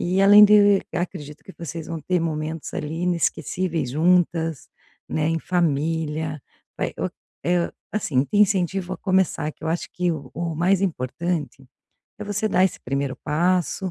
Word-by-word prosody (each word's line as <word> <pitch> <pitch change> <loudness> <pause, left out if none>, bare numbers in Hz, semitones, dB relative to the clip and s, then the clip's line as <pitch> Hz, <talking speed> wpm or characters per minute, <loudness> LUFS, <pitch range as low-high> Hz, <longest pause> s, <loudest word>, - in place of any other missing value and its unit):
e 185 +2 +1
além 205 +1 +9
de 205 -1 +6
acredito 170 -4 -5
que 190 - -12
vocês 165 -1 -6
vão 165 -2 -4
ter 180 +2 0
momentos 155 -1 -3
ali 155 +2 -4
inesquecíveis 170 -3 -1
juntas, 165 -1 +1 0.4
né, 155 -1 0
em 165 - 0
família, 160 -2 -1 0.4
vai - - -2
o - - 0 0.4
eh, 175 0 +1 0.2
assim, 145 -11 0
te 205 - -3
incentivo 190 -2 +2
a - - -3
começar, 185 -5 +1
que 155 - -13
eu 160 - -1
acho 170 +1 -2
que 180 -1 0
o 140 -5 -7
o 165 0 -3
mais 185 +4 +2
importante 155 -3 -3 0.5
é 210 - -5
você 205 +1 -1
dar 185 -1 +3
esse 190 - -1
primeiro 135 0 -2
passo. 180 +4 0
170 Hz, 160 wpm, -23 LUFS, 155-185 Hz, 0.5 s, além